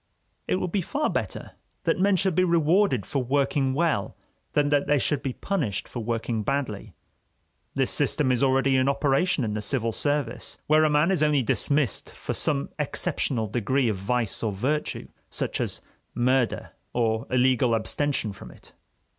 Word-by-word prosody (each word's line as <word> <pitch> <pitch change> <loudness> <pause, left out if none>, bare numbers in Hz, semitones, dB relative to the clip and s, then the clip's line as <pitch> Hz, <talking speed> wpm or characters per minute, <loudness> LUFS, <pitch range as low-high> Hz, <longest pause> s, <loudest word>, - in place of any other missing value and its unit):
It - - +1
would 185 -1 -2
be 195 - +1
far 290 - -1
better - - -3 0.3
that - - +1
men 200 +1 +4
should 190 +1 +1
be 185 +3 +3
rewarded 170 - +2
for 140 - -1
working 135 0 +1
well 155 -10 0 0.4
than 145 -1 +2
that 145 -1 +2
they 145 0 +3
should 140 +1 0
be 130 - -3
punished 125 - -2
for 120 - -6
working 115 0 -2
badly. 130 -4 -3 0.8
This - - +1
system 135 -4 +1
is 125 - +1
already 135 0 +3
in 130 +1 +3
operation 140 +2 +1
in 105 -2 -2
the 105 - -2
civil 115 +1 0
service, 145 -1 -2
where 155 +1 +4
a - - +3
man 150 +4 +3
is 185 - +1
only 150 -3 +3
dismissed 140 +1 0
for - - -5
some 70 -1 0
exceptional 115 -5 -1
degree 120 +4 +1
of 105 - -1
vice 115 +3 -1
or 110 - 0
virtue, 135 +10 -2 0.2
such - - -2
as - - -3 0.3
murder 125 0 +1 0.2
or 115 0 0
illegal 125 -2 +3
abstention 115 -1 -1
from - - -11
it. - - -15
135 Hz, 170 wpm, -26 LUFS, 115-150 Hz, 0.8 s, men